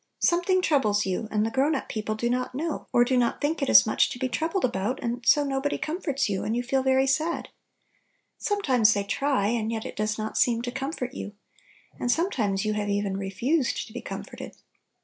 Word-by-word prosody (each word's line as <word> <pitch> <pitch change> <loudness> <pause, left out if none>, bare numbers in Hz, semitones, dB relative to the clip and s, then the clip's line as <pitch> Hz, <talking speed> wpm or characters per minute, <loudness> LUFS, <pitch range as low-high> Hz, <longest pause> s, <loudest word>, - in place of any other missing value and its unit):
Something 360 +2 +2
troubles 215 - +2
you, 190 +4 -2
and 215 0 +1
the 225 - -2
grown 275 +5 +2
up 265 - -4
people 215 0 -3
do 235 +2 -1
not 250 +1 -1
know, 315 +3 -3
or 240 0 +4
do 260 +1 +1
not 245 -2 +1
think 295 +3 -1
it - - 0
is 110 0 +8
much - - +2
to - - -6
be 260 - -1
troubled 320 - -1
about, 235 +2 -2
and 240 +1 -3
so 295 - +5
nobody 275 0 -1
comforts 305 -4 -2
you, 195 -2 -2
and 220 - -1
you 245 - -1
feel 265 +2 +1
very 265 0 +3
sad. 310 +5 0 0.9
Sometimes 260 - +2
they 200 - 0
try, 260 -1 0
and 225 -1 -1
yet 220 -1 -3
it - - -7
does 215 0 -1
not 215 0 -3
seem 235 -1 +2
to 245 - -3
comfort 270 -1 -4
you. 205 - -6 0.7
And 245 - +1
sometimes 225 - 0
you 215 - 0
have 210 -1 -2
even 200 -1 -1
"refused 235 - -1
to 220 - -15
be 245 - -5
comforted." - - -8
245 Hz, 210 wpm, -26 LUFS, 215-280 Hz, 0.9 s, is